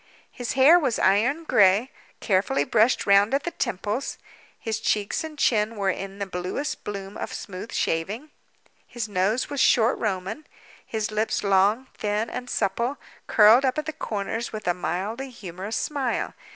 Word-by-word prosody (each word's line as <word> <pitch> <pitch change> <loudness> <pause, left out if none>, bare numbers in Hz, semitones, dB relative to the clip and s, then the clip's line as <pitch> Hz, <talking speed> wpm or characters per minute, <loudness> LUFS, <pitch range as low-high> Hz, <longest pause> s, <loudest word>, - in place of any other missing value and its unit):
His 245 -2 -4
hair 280 +7 +7
was 260 -8 0
iron 235 +12 +2
gray, 210 -2 +4 0.3
carefully 185 -8 +1
brushed 225 - +2
round 200 +5 +4
at 275 - -1
the 345 - -3
temples. 210 - -3 0.4
His 225 -2 -3
cheeks 210 +8 0
and 315 -1 -8
chin 220 -4 +2
were 200 -2 +1
in 195 +1 -6
the 200 - -3
bluest 185 +10 -4
bloom 200 -1 -6
of - - -5
smooth 195 +2 -7
shaving; 210 - -2 0.6
his 235 -3 -4
nose 205 +7 0
was 285 - -3
short 235 +1 +4
Roman; 210 +7 -3 0.4
his 220 -1 -3
lips 215 +1 -1
long, 200 +5 +3
thin, 210 +2 -2
and 250 0 -6
supple, 235 +7 -1 0.3
curled 220 +4 +6
up 260 0 +1
at 305 - -2
the 315 - -4
corners 225 +1 -4
with 215 -3 -7
a 175 - +3
mildly 200 +9 -3
humorous 195 -2 -6
smile. 275 -5 -2
215 Hz, 160 wpm, -25 LUFS, 195-250 Hz, 0.6 s, hair